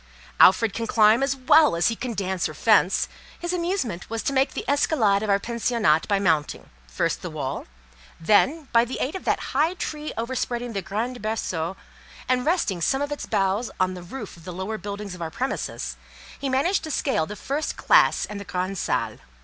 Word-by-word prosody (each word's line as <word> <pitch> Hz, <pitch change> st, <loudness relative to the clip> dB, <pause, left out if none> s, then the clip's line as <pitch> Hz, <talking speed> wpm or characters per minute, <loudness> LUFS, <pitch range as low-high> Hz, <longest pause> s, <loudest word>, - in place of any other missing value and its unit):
Alfred 200 Hz, +3 st, +6 dB
can 230 Hz, 0 st, -3 dB
climb 215 Hz, +2 st, +5 dB
as 275 Hz, 0 st, +1 dB
well 295 Hz, -, +5 dB
as 170 Hz, -, +3 dB
he 230 Hz, -, -2 dB
can 240 Hz, 0 st, -4 dB
dance 190 Hz, -4 st, -1 dB
or 155 Hz, -, -9 dB
fence: 205 Hz, 0 st, +3 dB, 0.3 s
his 345 Hz, +1 st, -3 dB
amusement 340 Hz, -, -2 dB
was 225 Hz, 0 st, -3 dB
to 275 Hz, -, -1 dB
make 265 Hz, +1 st, +1 dB
the -, -, -4 dB
escalade 245 Hz, -8 st, +2 dB
of 215 Hz, -, -3 dB
our 200 Hz, -, +5 dB
pensionnat 230 Hz, -6 st, +1 dB
by 200 Hz, -, +2 dB
mounting, 160 Hz, -7 st, 0 dB, 0.2 s
first -, -, -1 dB
the -, -, -5 dB
wall; -, -, -4 dB, 0.5 s
then—by 235 Hz, -, +3 dB
the 240 Hz, +2 st, -4 dB
aid 270 Hz, -, -1 dB
of 380 Hz, -, -6 dB
that -, -, -1 dB
high 310 Hz, +7 st, +2 dB
tree 305 Hz, -4 st, -4 dB
overspreading 240 Hz, 0 st, -2 dB
the 195 Hz, -, -2 dB
grand 225 Hz, +7 st, -3 dB
berceau, 190 Hz, -5 st, -2 dB, 0.5 s
and 255 Hz, +1 st, +1 dB
resting 265 Hz, -, +1 dB
some 270 Hz, -, +1 dB
of 285 Hz, -, -4 dB
its 290 Hz, -, -4 dB
boughs 195 Hz, +4 st, 0 dB
on 185 Hz, 0 st, +1 dB
the 180 Hz, -, -8 dB
roof 210 Hz, +4 st, -8 dB
of 170 Hz, -, -16 dB
the 180 Hz, -, -7 dB
lower 190 Hz, +5 st, -4 dB
buildings 200 Hz, 0 st, -6 dB
of 180 Hz, -, -10 dB
our 165 Hz, -, -3 dB
premises—he -, -, -5 dB
managed 300 Hz, +10 st, +1 dB
to 315 Hz, -, -5 dB
scale 265 Hz, -, 0 dB
the 210 Hz, -, -6 dB
first 285 Hz, +8 st, -3 dB
classe -, -, +4 dB
and 210 Hz, -1 st, -7 dB
the -, -, -6 dB
grand 185 Hz, 0 st, -3 dB
salle. -, -, -1 dB
220 Hz, 195 wpm, -24 LUFS, 190-270 Hz, 0.5 s, Alfred